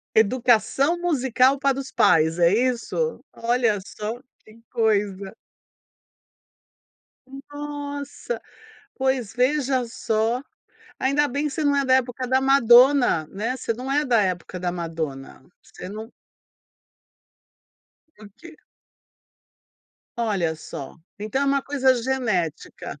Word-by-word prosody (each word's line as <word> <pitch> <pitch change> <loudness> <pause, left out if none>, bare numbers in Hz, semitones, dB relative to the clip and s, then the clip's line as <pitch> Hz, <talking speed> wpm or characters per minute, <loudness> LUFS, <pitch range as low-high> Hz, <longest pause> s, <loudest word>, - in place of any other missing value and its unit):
Educação 245 +7 +2
musical 265 -5 +2
para 275 -1 +1
os 270 - -8
pais, 160 +1 +3
é 170 +1 +4
isso? 255 - -1
Olha 230 -3 +1
só, 215 +4 -6 0.2
que 220 +1 -18
coisa. 205 -3 0 2.2
Nossa, 290 - -6 0.5
pois 260 -5 -1
veja 260 0 +1
só, 230 +2 -1 0.6
ainda 280 +3 +2
bem 285 +3 -2
que 300 - 0
você 310 - -3
não 285 -1 +2
é 280 -1 +1
da 260 - +5
época 255 0 -1
da 260 +1 +3
Madonna, 255 - +5
né, 220 +8 -3
você 230 - -2
não 255 +4 -6
é 295 +2 +1
da 235 -5 +3
época 180 -1 -3
da 175 0 -2
Madonna, 160 -6 -6 0.2
você - - -11
não 220 +3 -8 2.1
O - - -12
quê? 340 -1 -13 1.6
Olha 195 -8 0
só. 140 -3 -9 0.2
Então 215 +7 -2
é - - +2
uma 275 0 +2
coisa 265 -2 +2
genética. 215 - -3
245 Hz, 115 wpm, -23 LUFS, 210-275 Hz, 2.2 s, da